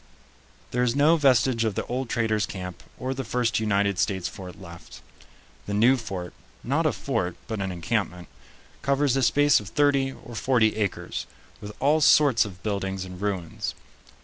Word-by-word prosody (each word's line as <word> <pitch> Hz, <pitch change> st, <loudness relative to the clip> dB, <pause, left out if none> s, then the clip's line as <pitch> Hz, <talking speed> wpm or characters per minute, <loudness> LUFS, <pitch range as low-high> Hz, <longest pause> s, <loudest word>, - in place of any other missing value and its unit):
There 125 Hz, -, 0 dB
is 125 Hz, 0 st, +1 dB
no 150 Hz, +4 st, +5 dB
vestige 130 Hz, -5 st, +3 dB
of 110 Hz, -3 st, -1 dB
the -, -, -2 dB
old 125 Hz, 0 st, -3 dB
traders' 110 Hz, -2 st, 0 dB
camp 90 Hz, -2 st, -7 dB, 0.2 s
or 130 Hz, +1 st, -3 dB
the 135 Hz, 0 st, -4 dB
first 120 Hz, -1 st, 0 dB
United 100 Hz, -2 st, +1 dB
States 95 Hz, -3 st, 0 dB
fort 90 Hz, -2 st, -9 dB
left. 85 Hz, -3 st, -12 dB, 0.7 s
The 100 Hz, -, -2 dB
new 120 Hz, +6 st, +5 dB
fort 95 Hz, -7 st, -6 dB, 0.3 s
not -, -, +1 dB
a -, -, +2 dB
fort, 90 Hz, 0 st, -2 dB
but 110 Hz, -3 st, -4 dB
an 95 Hz, -1 st, -2 dB
encampment 90 Hz, 0 st, -2 dB, 0.5 s
covers 140 Hz, -1 st, +2 dB
a 135 Hz, -, +1 dB
space 145 Hz, +4 st, +4 dB
of 105 Hz, -2 st, -9 dB
thirty 140 Hz, 0 st, +2 dB
or 120 Hz, -, -12 dB
forty 110 Hz, -1 st, +2 dB
acres, 105 Hz, -3 st, -3 dB, 0.3 s
with 105 Hz, 0 st, -7 dB
all 150 Hz, +4 st, +3 dB
sorts 140 Hz, -6 st, +5 dB
of 95 Hz, -2 st, -10 dB
buildings 95 Hz, -2 st, -2 dB
and 90 Hz, 0 st, -10 dB
ruins. 95 Hz, -5 st, -3 dB
110 Hz, 170 wpm, -25 LUFS, 95-130 Hz, 0.7 s, no